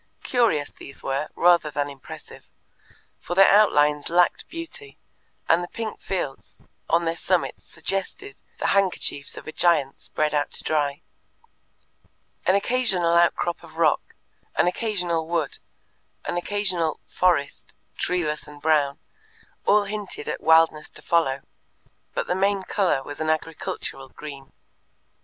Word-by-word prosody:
Curious 220 - +2
these 140 - -11
were, 140 +3 -1
rather 170 -3 +4
than 145 0 -1
impressive, 140 -2 -11 0.7
for 175 - -5
their 195 +1 +7
outlines 150 -8 +4
lacked 175 +1 +2
beauty, 385 +6 -8 0.5
and 170 +2 +4
the - - -5
pink 220 +1 -5
fields 160 -8 -4 0.3
on 170 +1 +3
their 165 0 0
summits 180 +1 -1
suggested 195 - -5 0.2
the - - 0
handkerchiefs 185 -7 0
of - - -9
a - - -4
giant 155 -6 +2
spread 155 0 -1
out 145 -1 +1
to - - -8
dry. 145 -2 0 1.4
An 185 - +5
occasional 200 -6 +2
outcrop 170 0 +2
of 160 -1 -14
rock, 160 -3 +1 0.4
an - - +3
occasional 180 -4 -1
wood, 165 -4 -1 0.7
an - - -2
occasional 180 -3 -1
"forest," 175 -6 0 0.2
treeless 155 -5 -1
and 150 0 -12
brown, 145 -2 +2 0.7
all 210 0 +5
hinted 205 -1 -5
at - - -3
wildness 160 -1 +4
to - - -12
follow, 140 -5 +2 0.7
but - - 0
the - - 0
main 195 +1 +1
colour 185 -10 +1
was 145 +3 -8
an 155 - 0
agricultural 155 -4 -3
green. 140 -2 -10
170 Hz, 135 wpm, -24 LUFS, 150-190 Hz, 1.4 s, their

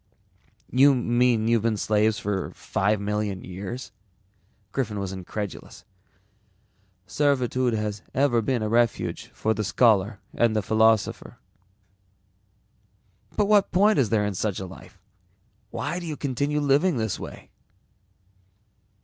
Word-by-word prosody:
"You 135 +2 +5
mean 120 -2 +2
you've 115 -1 +3
been 110 -1 0
slaves 105 +1 +1
for 100 -3 -2
five 105 +2 0
million 105 -1 -2
years?" 100 +7 -7 0.8
Griffin 110 -5 -2
was 100 -2 -3
incredulous. 95 +2 -7 1.2
"Servitude 130 -1 +1
has 105 -1 -3
ever 130 -4 +2
been 120 0 -1
a - - -1
refuge 115 +1 0
for 110 - -1
the 110 - -2
scholar 105 -1 +2
and 115 -2 +2
the 110 - +1
philosopher." 110 0 +1 2.0
"But 210 - +3
what 205 -1 +3
point 205 +2 +4
is 120 -6 +2
there 105 -2 +2
in 105 - -2
such 100 +1 -2
a 95 - -5
life? 95 0 -13 0.7
Why 150 +10 -3
do 175 - -7
you 155 -2 -4
continue 140 +2 -1
living 145 +3 +2
this 110 -3 -2
way?" - - -10
110 Hz, 125 wpm, -25 LUFS, 105-130 Hz, 2.0 s, You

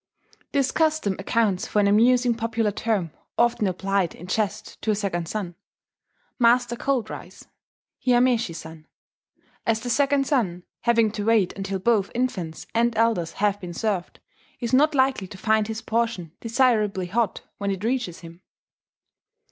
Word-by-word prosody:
This 275 -2 +1
custom 310 -11 +1
accounts 200 -1 +1
for - - -3
an 205 - +4
amusing 240 +4 +4
popular 225 -2 -1
term 200 -6 -1 0.3
often 235 -3 +2
applied 190 -1 0
in 175 - -10
jest 210 +2 -3
to - - -3
a 215 - +3
second 185 -5 -2
son, 195 -3 -4 0.9
"Master 240 0 +4
Cold 250 -3 -1
Rice" - - -10 0.6
(Hiameshi 245 -7 +3
San); 160 -1 -10 0.8
as 225 -1 +1
the 245 - -3
second 280 +1 +2
son, 190 - 0 0.2
having 230 -2 +3
to 210 -1 -4
wait 220 -5 +3
until 195 0 -3
both 205 0 +2
infants 190 -10 -2
and 230 0 +1
elders 220 -7 +1
have 205 0 0
been 175 -2 -7
served, 200 -4 -2 0.4
is 235 -1 -3
not 300 +3 +4
likely 260 -7 +2
to 195 - -11
find 215 +1 +2
his 220 0 -5
portion 225 -8 -1
desirably 225 -6 +1
hot 215 +3 -1 0.2
when 200 - -1
it 195 0 -3
reaches 235 -8 -2
him 170 +1 -12
220 Hz, 150 wpm, -24 LUFS, 190-240 Hz, 0.9 s, an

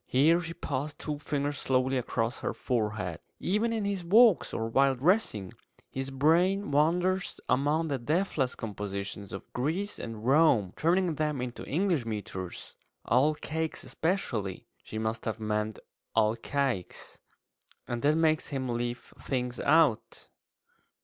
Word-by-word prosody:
Here 160 +7 +4
she 165 0 -6
passed 145 +2 -3
two 150 -2 -4
fingers 145 -1 -2
slowly 130 0 +1
across 120 -2 -1
her - - -3
forehead. 105 -8 -2 0.2
"Even 210 +5 +1
in 220 -3 -1
his 200 -3 -2
walks, 215 +3 +5
or 115 - -2
while 135 +3 +3
dressing, 130 - +1 0.4
his 135 0 -3
brain 165 +7 +2
wanders 175 +6 +1
among 145 +5 +2
the 140 -2 -1
deathless 150 -1 0
compositions 100 -2 -5
of - - -8
Greece 165 +11 -2
and 115 -1 -6
Rome, 130 - +4
turning 175 +1 +2
them 150 -3 0
into 125 -1 -5
English 170 -3 +1
metres 95 -4 -5 0.3
all 140 +7 +3
cakes 160 +1 -3
especially" 120 - -2 0.2
she 110 - -7
must 110 +1 -2
have 110 0 -2
meant 105 0 -1 0.4
alcaics 115 -1 -1 0.7
"and 120 -1 -3
that 150 +3 +3
makes 160 -1 +2
him 130 -3 -3
leave 120 +1 -3
things 125 -2 -2
about." 150 -7 +2
135 Hz, 135 wpm, -29 LUFS, 115-165 Hz, 0.7 s, walks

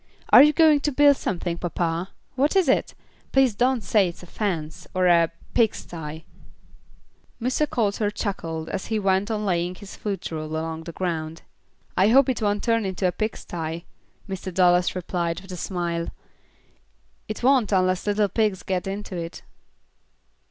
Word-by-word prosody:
"Are - - +10
you 300 +2 +7
going 310 -1 +5
to 295 +1 -1
build 285 +1 +5
something, 175 -2 -3
papa? 170 +1 -2 0.2
What 280 +6 +1
is 380 -5 +4
it? 265 - +1 0.4
Please 270 -4 +4
don't 245 +2 +1
say 195 0 +3
it's 170 +1 -8
a - - -9
fence, 165 -5 -4
or 185 0 +2
a 170 -1 +5
a - - -10 0.2
pig 225 -3 +3
sty." 160 -1 -8 1.2
Mr. 255 +5 0
Coulter 210 -2 0
chuckled 165 -6 -4
as 190 - -4
he 220 - 0
went 195 0 +1
on 215 -1 -2
laying 175 -1 0
his 200 +1 -11
foot 200 -4 -4
rule 155 -1 -4
along 160 0 -4
the 170 - -6
ground. 165 -2 -4 0.5
"I 190 - +4
hope 265 +4 +5
it 250 - -1
won't 205 -1 0
turn 230 -1 +2
into 190 -1 -2
a - - +1
pig 215 +4 -3
sty," 165 0 -5 0.4
Mr. 190 -1 -5
Dallas 180 0 +3
replied, 175 -2 -2
with 190 0 -12
a - - -4
smile. 170 -2 -3 1.2
"It 215 +2 -6
won't 255 -5 +4
unless 185 0 +1
little 205 0 +2
pigs 210 -2 0
get 190 0 -2
into 195 0 -5
it." 170 0 -6
190 Hz, 170 wpm, -24 LUFS, 170-220 Hz, 1.2 s, Are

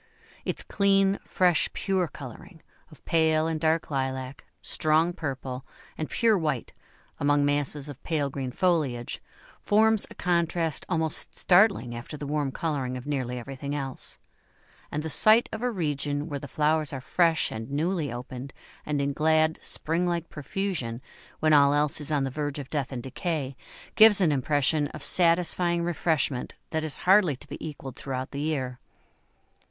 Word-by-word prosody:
Its - - -1
clean, 195 0 +3
fresh, 180 -4 +3
pure 190 -3 0
colouring, 155 - -11 0.3
of 155 - -18
pale 160 -1 +3
and 160 -1 -1
dark 160 0 +1
lilac, 130 -1 -3 0.2
strong 160 +3 +2
purple, 130 -4 -5 0.3
and 155 - -4
pure 230 -2 +3
white, 150 -7 -2 0.5
among 145 0 +3
masses 145 0 0
of 145 -2 -9
pale 155 -4 -1
green 130 -2 -4
foliage, 145 -8 0 0.4
forms 220 0 +3
a - - -12
contrast 170 -2 0
almost 160 -3 +1
startling 185 - +4
after 125 +6 -7
the 145 - -6
warm 145 -1 -1
colouring 135 -5 -2
of 125 - -9
nearly 130 -4 -2
everything 135 +3 -5
else; 135 -2 -4 0.7
and 150 +1 -2
the 160 - -3
sight 220 +7 +5
of 220 - -5
a 250 - +1
region 150 - -2
where 145 -3 -4
the 140 - -8
flowers 155 +1 +1
are 135 - -4
fresh 165 +4 +2
and 110 +2 -6
newly 155 0 -1
opened, 125 +2 -7 0.3
and 145 -2 0
in 140 0 -1
glad 155 +1 +2
spring 170 +3 0
like 170 -1 -2
profusion, 150 - -3 0.4
when 155 0 +4
all 140 -1 +6
else 150 +1 +1
is 150 - -1
on 145 -2 +1
the 135 - -2
verge 145 +1 -3
of 140 -2 -7
death 140 -4 -2
and 125 -3 -5
decay, 140 0 -3 0.4
gives 215 -2 +7
an 175 -5 +3
impression 145 +2 +1
of 145 - -9
satisfying 170 +1 +3
refreshment 160 -6 0 0.2
that 160 -1 -1
is 155 -2 -1
hardly 185 -5 +5
to 130 - -14
be 145 - -8
equalled 135 -4 -8
throughout 130 -1 -5
the 140 - -4
year. 130 -5 -2
150 Hz, 160 wpm, -27 LUFS, 135-170 Hz, 0.7 s, gives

